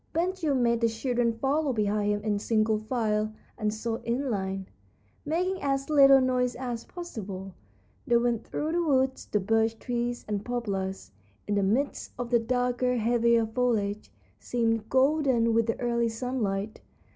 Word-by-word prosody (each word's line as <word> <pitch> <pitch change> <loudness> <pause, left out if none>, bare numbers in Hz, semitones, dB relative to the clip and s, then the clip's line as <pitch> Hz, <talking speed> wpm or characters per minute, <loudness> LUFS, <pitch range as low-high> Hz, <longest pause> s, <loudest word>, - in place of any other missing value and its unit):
Ben 345 +3 +1
Gile 320 -7 -1
made 235 -2 +2
the 230 - +4
children 235 +1 0
follow 280 +3 +1
behind 210 -1 +1
him 205 0 -2
in 210 -1 0
single 215 0 +1
file, 215 -2 -1 0.2
and 215 -2 -1
so 225 +1 -3
in 250 +4 -2
line, 190 -2 -3 0.6
making 365 +4 -1
as 275 +1 -1
little 275 -2 +7
noise 250 -1 +1
as 245 -2 -5
possible, 200 - -7 0.5
they 240 - +5
went 235 -1 0
through 310 +1 -3
the 345 +1 +1
woods. 265 -4 +1
The 210 - +1
birch 225 +3 +1
trees 240 0 -3
and 205 -1 -2
poplars, 200 -6 -3 0.4
in 205 - 0
the 200 - +2
midst 230 +9 -1
of 245 0 -4
the 240 - +5
darker, 250 +1 0
heavier 235 0 +3
foliage, 220 -3 -1 0.3
seemed 225 -2 -1
golden 265 -4 +3
with 230 0 +2
the 230 - -1
early 235 -1 +1
sunlight. 225 -4 -3
235 Hz, 155 wpm, -28 LUFS, 215-255 Hz, 0.6 s, little